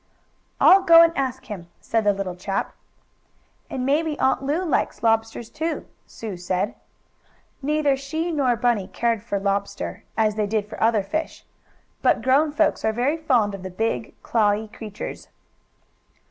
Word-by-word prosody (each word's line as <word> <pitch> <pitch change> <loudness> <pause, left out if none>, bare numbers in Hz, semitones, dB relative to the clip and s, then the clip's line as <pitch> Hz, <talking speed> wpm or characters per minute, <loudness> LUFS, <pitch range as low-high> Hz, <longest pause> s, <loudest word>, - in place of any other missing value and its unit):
"I'll 390 - +7
go 335 -2 +8
and 335 0 +2
ask 260 -1 -2
him," 185 -7 -8
said 225 -2 -1
the 205 - +5
little 195 -2 -4
chap. 195 +2 -3 1.0
"And 255 -1 -3
maybe 300 +2 +1
Aunt 265 - +2
Lu 300 +7 -1
likes 310 - -1
lobsters, 225 0 0
too," 320 +2 -3 0.2
Sue 215 -5 -7
said. 180 +3 -1 0.9
Neither 295 0 +2
she 315 +5 -3
nor 270 -6 +2
Bunny 235 -5 +1
cared 230 +2 -1
for 205 -2 -3
lobster, 195 - -2
as 215 -1 +3
they 210 -1 -1
did 210 0 -1
for 215 - -9
other 220 -2 +3
fish. 315 +12 -4 0.6
But - - +2
grown 285 +4 +3
folks 315 +1 +1
are 220 - +2
very 250 +8 0
fond 245 -10 +2
of 195 - -7
the 190 - -6
big, 225 +4 -2
clawy 215 -1 +1
creatures. 215 0 -8
230 Hz, 155 wpm, -23 LUFS, 205-285 Hz, 1.0 s, go